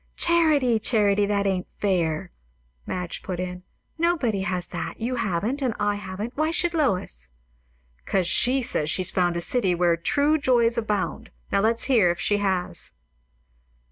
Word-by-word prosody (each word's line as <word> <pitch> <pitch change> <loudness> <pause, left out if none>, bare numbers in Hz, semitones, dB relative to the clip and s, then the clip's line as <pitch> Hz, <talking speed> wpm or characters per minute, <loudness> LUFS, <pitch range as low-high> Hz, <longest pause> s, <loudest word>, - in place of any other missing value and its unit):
"Charity, 305 -9 +3
Charity, 205 -3 +2
that 200 -1 0
ain't 190 -2 -1
fair," 175 -3 -1 0.6
Madge 180 -1 -4
put 180 -2 -5
in. 180 0 -4 0.4
"Nobody 310 - +1
has 180 -1 -2
that; 175 - -5
you 245 +3 -2
haven't, 220 +5 -1
and 250 -5 -1
I 205 0 +1
haven't; 205 +4 -6
why 310 +2 +1
should 345 +1 0
Lois?" 180 - -1 0.8
"'Cos 190 -2 +1
she 255 +8 +3
says 155 -9 0
she's 185 +2 0
found 175 -2 +1
'a - - -2
city 190 -2 +2
where 175 -1 +2
true 285 - +1
joys 240 -4 +2
abound;' 210 -4 -2 0.2
now 200 - +2
let's 230 +3 +2
hear 240 -9 +4
if 175 - -1
she 205 - +1
has." 190 -3 -2
205 Hz, 155 wpm, -24 LUFS, 180-250 Hz, 0.8 s, hear